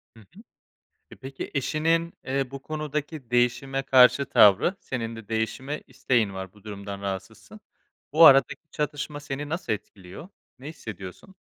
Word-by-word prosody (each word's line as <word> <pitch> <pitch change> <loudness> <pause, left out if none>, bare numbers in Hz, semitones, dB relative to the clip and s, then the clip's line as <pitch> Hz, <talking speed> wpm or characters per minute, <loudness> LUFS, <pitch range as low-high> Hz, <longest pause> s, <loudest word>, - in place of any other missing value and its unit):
Hı - - -15
hı. 160 - -17 0.7
E, - - -11
peki 135 0 -8
eşinin, 165 +4 0
eee, 135 -1 -2
bu 135 0 -8
konudaki 150 -3 -5
değişime 135 +3 +1
karşı 130 +1 +5
tavrı, 105 - +5
senin 115 -7 -5
de 115 -2 -11
değişime 125 +6 -3
isteğin 125 -5 0
var, 95 -1 -7
bu 105 - -20
durumdan 100 -1 -7
rahatsızsın. 95 -2 -7 0.5
Bu 165 +2 +8
aradaki 140 +3 +5
çatışma 150 0 -4
seni 145 0 -6
nasıl 165 -7 -2
etkiliyor, 100 - -10 0.3
ne 140 +3 -8
hissediyorsun? 110 - -10
135 Hz, 140 wpm, -26 LUFS, 110-150 Hz, 0.7 s, Bu